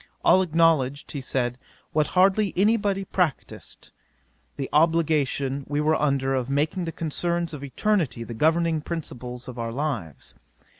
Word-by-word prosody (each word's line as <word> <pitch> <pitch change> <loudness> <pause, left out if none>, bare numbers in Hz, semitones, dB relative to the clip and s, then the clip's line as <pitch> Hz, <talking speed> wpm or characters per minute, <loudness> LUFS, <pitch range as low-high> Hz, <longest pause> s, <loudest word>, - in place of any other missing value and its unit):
All 190 - +6
acknowledged, 160 -6 +2
he 140 - -5
said, 125 -1 -2 0.3
what 155 -1 +2
hardly 195 +1 +3
any 210 +4 +4
body 200 -3 -1
practised, 180 -6 -3 0.7
the 135 - -3
obligation 150 -4 +2
we 145 0 0
were 155 +1 +2
under 135 -3 +1
of 130 -1 -1
making 155 +6 0
the 165 - -3
concerns 170 +2 -2
of 145 -2 -7
eternity 145 - 0
the 115 - -7
governing 160 +5 +2
principles 125 -7 -6
of 125 -1 -8
our 115 0 -3
lives. 120 - -4
150 Hz, 145 wpm, -25 LUFS, 135-170 Hz, 0.7 s, All